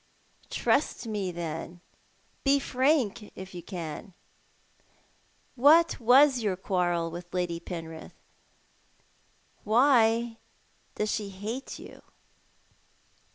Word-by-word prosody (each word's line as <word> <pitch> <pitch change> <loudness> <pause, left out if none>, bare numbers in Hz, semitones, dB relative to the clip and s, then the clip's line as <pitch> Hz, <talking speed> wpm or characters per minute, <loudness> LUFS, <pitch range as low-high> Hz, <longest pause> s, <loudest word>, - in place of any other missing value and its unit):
" - - -38
Trust - - 0
me, 205 -4 -2
then. 170 0 -6 0.6
Bo 275 0 +4
frank, 255 -6 0
if 190 0 -9
you 175 - -7
can. 175 +1 -7 1.4
What 310 +6 +5
was 255 +3 +6
your 205 -4 0
quarrel 175 -3 -1
witli 175 +1 -9
Lady 175 -2 -1
Penrith? 165 -2 -8 1.5
Why 230 -1 +3 0.6
does 210 0 -1
she 210 -2 -2
hate 215 +7 -6
you - - -12
205 Hz, 95 wpm, -28 LUFS, 175-245 Hz, 1.5 s, was